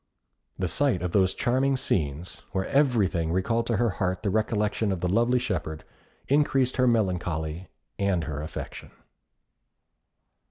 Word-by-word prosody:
The 95 - -1
sight 95 - +1
of 90 - -1
those 95 -1 +2
charming 130 +2 +1
scenes, 80 - -2
where 95 -1 0
everything 105 - +2
recalled 115 +6 0
to 115 - +1
her 115 0 +2
heart 95 0 0
the 100 - 0
recollection 105 0 0
of 95 - -2
the 90 - -1
lovely 120 +6 +3
shepherd, 85 -10 -3 0.4
increased 135 -3 +2
her 125 -1 +4
melancholy 90 -6 -1 0.3
and 100 -4 +1
her 75 -2 -4
affection. 80 - -7
100 Hz, 135 wpm, -26 LUFS, 90-120 Hz, 0.4 s, her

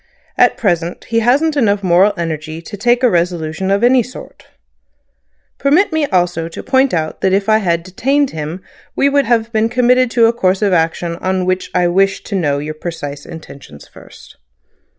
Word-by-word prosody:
At - - +3
present 175 -4 -1
he 230 0 0
hasn't 280 +7 +2
enough 205 -7 +1
moral 190 +3 +3
energy 160 -1 -4
to 170 +5 -9
take 240 +5 +1
a - - +6
resolution 170 0 -1
of 200 +3 +1
any 250 +1 +5
sort. 250 +3 -11 1.1
Permit 320 +7 +2
me 315 -2 0
also 175 -4 0
to 165 - -9
point 265 -1 +2
out 155 -2 -3
that 190 - +1
if 195 +1 0
I 215 0 +4
had 170 -4 -1
detained 270 +10 0
him 160 +4 -6 0.3
we 280 - +2
would 280 0 +2
have 230 -1 0
been 220 0 +1
committed 250 +1 +2
to 235 -1 +3
a 230 - +3
course 190 -3 0
of 200 -2 +2
action 170 0 -1
on 185 0 -2
which 185 0 -2
I 180 -1 +2
wished 195 +2 +1
to 200 - -4
know 145 -7 0
your 150 +2 -5
precise 155 -3 -7
intentions 140 - -12
first." - - -16
190 Hz, 185 wpm, -16 LUFS, 170-240 Hz, 1.1 s, a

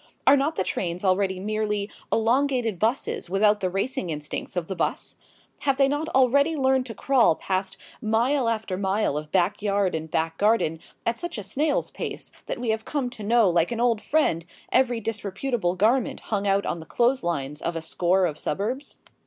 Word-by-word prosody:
Are 275 - +8
not 285 +3 0
the - - 0
trains 180 +1 -3
already 190 0 +2
merely 210 0 -1 0.2
elongated 235 -3 +1
buses 220 -5 -1
without 205 +2 +3
the 185 - 0
racing 195 0 -2
instincts 150 +3 -4
of 175 -2 -1
the 190 - -5
bus? 170 - -2 0.4
Have 275 -2 +1
they 275 -1 +5
not 290 +3 -1
already 280 +5 +3
learned 265 -2 +2
to 225 - -7
crawl 250 -8 +3
past 190 +2 -2 0.2
mile 235 +3 +2
after 220 -5 -2
mile 195 -4 0
of 150 0 -5
backyard 195 +1 +1
and 160 0 -4
back 160 +1 -1
garden 205 -7 +2 0.3
at 230 0 0
such 345 -7 -4
a 210 - -4
snail's 285 +10 0
pace - - -5 0.2
that - - -2
we 240 -2 0
have 220 0 -2
come 265 -3 -2
to 240 - -9
know 225 +1 +4
like 170 +1 +2
an 235 - -2
old 235 -3 +2
friend 280 - +1 0.3
every 250 -2 +3
disreputable 210 -1 -2
garment 225 +7 +2
hung 205 -1 0
out 195 0 +2
on 170 - -2
the 160 - -11
clothes 250 +2 +2
lines 150 -3 -3
of 170 0 -2
a - - -1
score 180 +3 +2
of 155 -3 -3
suburbs? 240 - -3
210 Hz, 185 wpm, -25 LUFS, 185-250 Hz, 0.4 s, Are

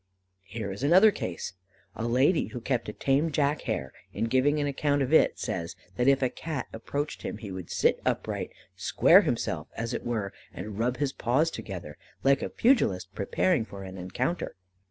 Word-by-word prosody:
Here 100 0 -5
is 95 - -7
another 185 +9 +7
case: 90 - -5 0.4
A 115 - -2
lady 130 +8 +3
who 125 - -6
kept 120 -1 -1
a - - -5
tame 140 +7 +1
Jack 145 0 +1
Hare, 65 -1 -2 0.2
in - - -2
giving 130 +6 +2
an 145 - +1
account 145 0 +1
of 135 +4 -2
it, - - +5
says, 85 0 -3 0.2
that 125 - +1
if 135 -1 +4
a 130 - +3
Cat 155 -4 -4
approached 140 +6 -4
him - - -4
he 105 -3 -8
would 95 -2 -7
sit - - +2
upright, - - -1 0.3
"square - - +5
himself," - - -2
as 115 0 -3
it - - -3
were, 110 -5 -2 0.2
and 105 +3 -7
rub 125 +2 +1
his 145 -2 -1
paws 135 +8 +1
together 90 - -7 0.3
like 135 0 +4
a - - -2
pugilist 95 - +2
preparing 115 - +1
for 100 -3 -9
an 95 0 -8
encounter. 125 - -2
125 Hz, 185 wpm, -28 LUFS, 100-145 Hz, 0.4 s, another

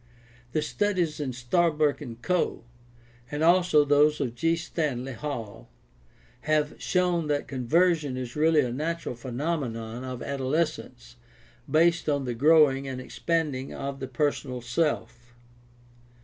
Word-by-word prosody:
The 155 - +1
studies 175 -2 0
of 130 -4 -3
Starbuck 150 +3 +1
and 120 -5 -8
Coe, 180 -5 0 0.7
and 150 +1 -2
also 175 -3 +5
those 150 +1 +4
of 125 -5 -2
G. 165 +7 +1
Stanley 140 -6 -3
Hall, 115 -6 -6 0.8
have 150 -1 +2
shown 180 -3 +1
that 145 -1 -1
"conversion" 145 +2 +1
is 125 -2 -5
really 155 0 +4
a 125 -3 -2
natural 165 +2 -3
phenomenon 120 -2 -4
of 130 -1 -6
adolescence 135 -3 -3 0.5
based 165 0 +3
on 140 -2 0
the 125 - -2
growing 140 0 +4
and 130 -1 -4
expand 160 +2 -1
ing 130 +1 -6
of 135 0 -5
the 135 - -4
personal 130 -1 -1
self. 120 -2 -2
145 Hz, 130 wpm, -27 LUFS, 125-160 Hz, 0.8 s, also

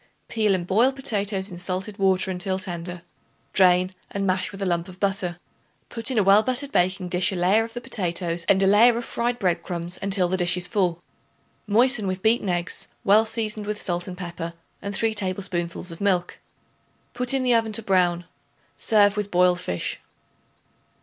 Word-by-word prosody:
Peel 215 -3 +2
and 175 -2 -3
boil 225 +8 +3
potatoes 205 -7 -2
in 175 - -8
salted 185 +3 -3
water 190 -1 +2
until 185 +1 -1
tender; 175 -1 -6 0.5
drain 185 -1 +4 0.2
and 200 0 -3
mash 185 -1 0
with 195 - -10
a 195 - -2
lump 170 -2 -1
of 185 0 -13
butter. 195 -3 -1 0.5
Put 230 +1 0
in 255 - -1
a 210 - +4
well 195 +2 +6
buttered 255 +4 -3
baking 185 0 0
dish 180 +3 +1
a - - -3
layer 185 +5 +3
of 225 0 -8
the 240 - -4
potatoes 170 -5 -2
and 195 0 +4
a - - +4
layer 225 +4 +5
of 235 - -4
fried 240 +1 -1
bread 185 -7 0
crumbs 175 0 -5
until 195 -2 +1
dish 180 -1 +2
is 180 - 0
full. 180 -5 -1 0.6
Moisten 225 0 +3
with 185 0 -4
beaten 220 -2 +2
eggs, 175 0 -2 0.2
well 210 +3 +5
seasoned 220 -2 -3
with 210 0 -3
salt 175 -2 -2
and 180 -1 -7
pepper, 170 -2 -6 0.3
and 200 0 -4
3 225 -1 +1
tablespoonfuls 185 -3 -2
of 165 - -10
milk. 185 -3 0 0.7
Put 250 0 -1
in 270 -1 +1
the 250 -1 +3
oven 225 -1 +2
to 225 - +1
brown. 180 -3 +1 0.5
Serve 205 -3 +3
with 210 -1 -3
boiled 180 -1 +3
fish. 90 - -4
190 Hz, 185 wpm, -24 LUFS, 180-215 Hz, 0.7 s, well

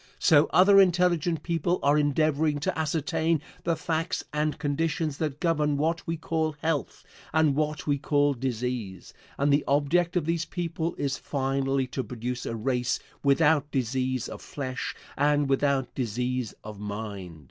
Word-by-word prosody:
So 150 -4 +5
other 195 +2 +7
intelligent 175 -3 +2
people 170 +1 0
are 145 +1 +4
endeavoring 150 0 +2
to - - -1
ascertain 160 +1 0 0.3
the 170 -1 +2
facts 160 +1 -2
and 150 0 0
conditions 155 0 -1
that 150 -3 -2
govern 150 -4 +1
what 160 +3 -1
we 165 0 -1
call 160 0 -1
health, 145 - -2 0.3
and 155 -3 +3
what 150 -1 -1
we 145 -2 +1
call 145 0 +2
disease, 120 -6 -4 0.2
and 140 +1 +2
the 145 - +3
object 160 +5 +2
of 165 - 0
these 165 0 0
people 165 0 -3
is 135 -1 -2
finally 135 -1 0
to 130 +1 -4
produce 125 +2 -5
a 115 - -3
race 125 +2 0 0.2
without 145 +1 +3
disease 130 -1 -1
of - - -8
flesh 130 -3 -5 0.2
and 145 0 +2
without 135 -1 +1
disease 125 0 -2
of 105 -1 -9
mind. 100 -5 -6
145 Hz, 150 wpm, -27 LUFS, 130-160 Hz, 0.3 s, other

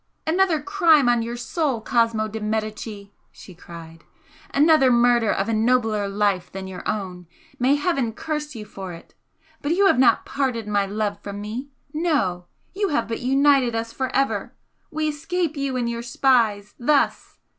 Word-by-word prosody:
"Another 340 0 +2
crime 325 -5 +3
on 240 -1 +3
your 235 +1 -4
soul, 275 0 -1
Cosmo 225 -2 +1
de 220 +1 -6
Medicis!" 215 -1 -4 0.2
she 185 - -13
cried 165 -1 -12 0.5
"Another 300 -2 +5
murder 240 -2 +3
of 195 - -1
a 230 - 0
nobler 220 -2 +1
life 200 -2 0
than 190 0 -6
your 190 -1 -7
own! 180 -4 -4 0.3
may 260 +3 +3
Heaven 290 -6 0
curse 300 +3 -5
you 215 -2 -7
for 190 -3 -8
it! 165 - -13 0.5
But 290 +3 0
you 395 +3 +3
have 320 -10 +4
not 260 - +4
parted 255 -6 -2
my 205 -1 +1
love 210 0 -2
from 200 0 -7
me 225 +7 -6 0.2
no! 255 - 0 0.3
you 400 0 -1
have 295 - 0
but 225 - -3
united 270 -1 +3
us 230 0 -3
for 260 - -2
ever! 275 0 0 0.3
We 310 0 -2
escape 325 +2 -2
you 275 -2 -2
and 240 -1 -1
your 235 0 -3
spies 235 -4 +1
thus!" 280 +4 +1
235 Hz, 165 wpm, -23 LUFS, 210-285 Hz, 0.5 s, Another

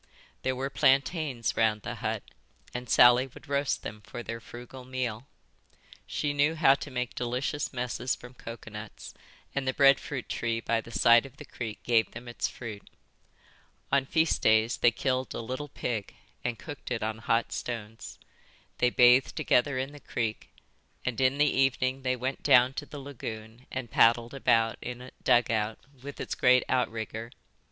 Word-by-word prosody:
There 130 0 0
were 135 +2 -3
plantains 135 -3 +1
round 110 -2 +2
the - - -4
hut - - -3 0.5
and 125 -1 -5
Sally 125 +2 +6
would 130 - -15
roast 140 0 0
them 105 +1 -7
for 120 +3 -8
their 115 0 -5
frugal 120 +3 -10
meal. 125 -1 -4 0.8
She 145 -1 -1
knew 145 +3 +2
how 155 -4 +6
to 140 - -5
make 125 -2 -3
delicious 125 +4 -2
messes 125 0 -2
from 125 +1 -13
coconuts, 110 -3 -9 0.4
and 140 -1 -2
the 130 - 0
bread 140 -1 +6
fruit 135 -4 -5
tree 115 -1 -1
by 115 0 0
the 115 - -13
side 115 +4 +5
of 130 - -19
the - - -10
creek 110 -4 -7
gave 115 -2 +2
them 120 +2 -9
its 120 - -2
fruit. 110 -4 -8 1.0
On 135 -1 +2
feast 160 +2 +2
days 110 +1 +3
they 120 - +5
killed 130 +2 -2
a - - -3
little 130 +5 -4
pig 115 -5 -4 0.3
and 120 -1 -2
cooked 145 +4 -8
it 120 -3 -2
on 110 0 -2
hot 115 +1 0
stones. 115 -2 -6 0.6
They 125 - +4
bathed 125 +1 +5
together 130 +2 +2
in 130 +2 -2
the 145 - -11
creek; 115 -4 -3 0.6
and 125 0 -1
in 130 +1 +3
the 150 - +5
evening 135 -1 +1
they 130 -1 0
went 130 +2 -3
down 125 +1 +5
to 145 +1 -6
the 150 - -9
lagoon 115 -4 -8
and 130 -3 -5
paddled 115 +1 +4
about 115 -4 +2
in 125 0 -6
a 125 +1 -10
dugout, 110 -2 +2 0.2
with 140 +1 -8
its - - -3
great 125 -1 +4
outrigger. 115 -2 -2
125 Hz, 170 wpm, -29 LUFS, 115-135 Hz, 1.0 s, Sally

